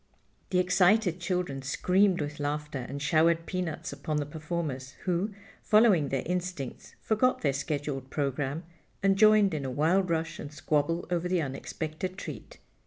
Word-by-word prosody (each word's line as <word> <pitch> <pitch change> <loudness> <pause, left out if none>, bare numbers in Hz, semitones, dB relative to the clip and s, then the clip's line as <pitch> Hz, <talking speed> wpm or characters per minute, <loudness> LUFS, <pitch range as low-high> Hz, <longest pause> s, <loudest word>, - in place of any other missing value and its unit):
The 185 - +1
excited 180 +1 +3
children 175 -6 -2
screamed 180 +7 +2
with 150 0 -4
laughter 145 -3 -3
and 140 - -4
showered 165 +3 +3
peanuts 180 -2 -3
upon 155 -1 -3
the 145 - 0
performers, 150 -3 -4
who, 190 +3 -1 0.3
following 210 -10 +4
their 135 -2 -1
instincts, 180 -6 -4
forgot 240 +4 +2
their 140 -3 +2
scheduled 140 -1 -3
program 140 +2 -2 0.4
and 195 0 +4
joined 215 -2 +5
in 150 -3 -2
a 135 - -2
wild 165 +8 +2
rush 165 0 -1
and 145 - -7
squabble 155 +3 0
over 175 0 0
the 180 -3 +1
unexpected 155 +6 -5
treat. - - -8
165 Hz, 150 wpm, -29 LUFS, 145-180 Hz, 0.4 s, joined